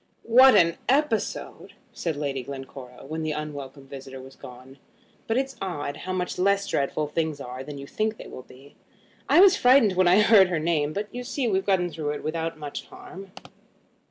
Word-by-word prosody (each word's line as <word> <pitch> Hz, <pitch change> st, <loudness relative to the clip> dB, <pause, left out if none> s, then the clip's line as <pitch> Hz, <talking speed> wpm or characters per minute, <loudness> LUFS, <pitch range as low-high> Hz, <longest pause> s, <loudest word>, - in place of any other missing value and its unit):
"What 255 Hz, +3 st, +7 dB
an 170 Hz, -1 st, +4 dB
episode!" 270 Hz, -4 st, -1 dB, 0.2 s
said 165 Hz, -3 st, -3 dB
Lady 140 Hz, -2 st, -3 dB
Glencora, 135 Hz, -1 st, -10 dB
when 160 Hz, +3 st, -5 dB
the 155 Hz, -1 st, -2 dB
unwelcome 145 Hz, -2 st, -7 dB
visitor 135 Hz, -1 st, -9 dB
was 130 Hz, +1 st, -13 dB
gone; 130 Hz, +2 st, -13 dB, 0.5 s
"but 225 Hz, -, 0 dB
it's 270 Hz, 0 st, -2 dB
odd 145 Hz, -6 st, -4 dB
how 185 Hz, -, -6 dB
much 180 Hz, -1 st, -3 dB
less 200 Hz, +1 st, +2 dB
dreadful 150 Hz, -3 st, -1 dB
things 155 Hz, 0 st, -3 dB
are 130 Hz, -1 st, -7 dB
than 145 Hz, +1 st, -8 dB
you 140 Hz, -, -8 dB
think 215 Hz, +8 st, -2 dB
they -, -, -10 dB
will -, -, -9 dB
be. 135 Hz, +3 st, -18 dB, 0.5 s
I -, -, +6 dB
was 390 Hz, -1 st, +7 dB
frightened 250 Hz, -, +4 dB
when 185 Hz, 0 st, +2 dB
I 185 Hz, +4 st, +5 dB
heard 210 Hz, -3 st, +6 dB
her 180 Hz, -2 st, -1 dB
name; 155 Hz, -2 st, 0 dB
but 205 Hz, +6 st, -4 dB
you 245 Hz, 0 st, -5 dB
see 260 Hz, 0 st, -2 dB
we've 195 Hz, -2 st, -1 dB
got 185 Hz, -3 st, +2 dB
through 150 Hz, -2 st, -3 dB
it 150 Hz, -, -7 dB
without 165 Hz, +1 st, -3 dB
much 145 Hz, -2 st, -7 dB
harm." 195 Hz, 0 st, -12 dB
160 Hz, 190 wpm, -25 LUFS, 140-200 Hz, 0.5 s, What